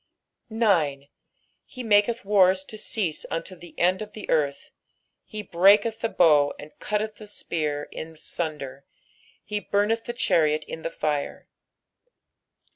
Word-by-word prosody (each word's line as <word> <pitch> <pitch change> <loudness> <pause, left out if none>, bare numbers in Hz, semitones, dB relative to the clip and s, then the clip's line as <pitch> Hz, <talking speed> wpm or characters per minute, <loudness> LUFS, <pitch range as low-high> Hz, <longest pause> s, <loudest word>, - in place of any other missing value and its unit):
9 165 -12 +1 0.5
He 255 - -9
maketh 220 +1 +2
wars 190 -2 +4
to 215 - -10
cease 210 -6 -2
unto 165 +3 -4
the 175 -1 -14
end 185 +3 +2
of 210 -1 -7
the 215 - -8
eaith; 145 -3 0 0.6
he 215 -1 -7
breaketh 205 +5 +4
the 230 - -1
bow, 150 -7 +4
and 150 - -11
cutteth 210 0 -2
the 215 - -11
spear 150 -7 -3
in 160 0 -8
sunder; 140 -5 -5 0.6
he 210 0 -2
bumeth 210 +3 0
the 240 - -4
chariot 155 -10 +2
in 160 - -8
the 165 - -3
fire. 150 -3 -3
185 Hz, 135 wpm, -25 LUFS, 155-210 Hz, 0.6 s, wars